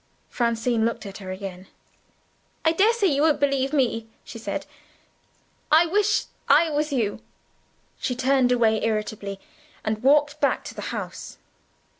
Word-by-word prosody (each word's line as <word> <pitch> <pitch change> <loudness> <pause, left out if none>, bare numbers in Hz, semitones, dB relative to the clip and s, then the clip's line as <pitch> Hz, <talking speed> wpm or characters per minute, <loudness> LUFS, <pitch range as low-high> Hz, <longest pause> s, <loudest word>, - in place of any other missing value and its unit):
Francine 235 -1 0
looked 230 -1 -1
at 195 0 -8
her 190 -2 -8
again. 185 -1 -7 1.0
"I 320 - +5
daresay 420 +5 +3
you 290 -6 +2
won't 310 -1 +3
believe 275 -1 +1
me," 245 -6 0 0.2
she 230 - -9
said. 225 - -4 1.1
"I 320 +3 +7
wish 415 +4 +2 0.3
I 310 +3 +5
was 300 +1 -1
you." 225 -7 -1 0.8
She 250 - -2
turned 260 0 +2
away 225 -3 +2
irritably, 210 -2 -2 0.5
and 215 0 -1
walked 290 +2 +3
back - - +1
to - - -8
the - - -7
house. - - -6
250 Hz, 140 wpm, -24 LUFS, 220-295 Hz, 1.1 s, I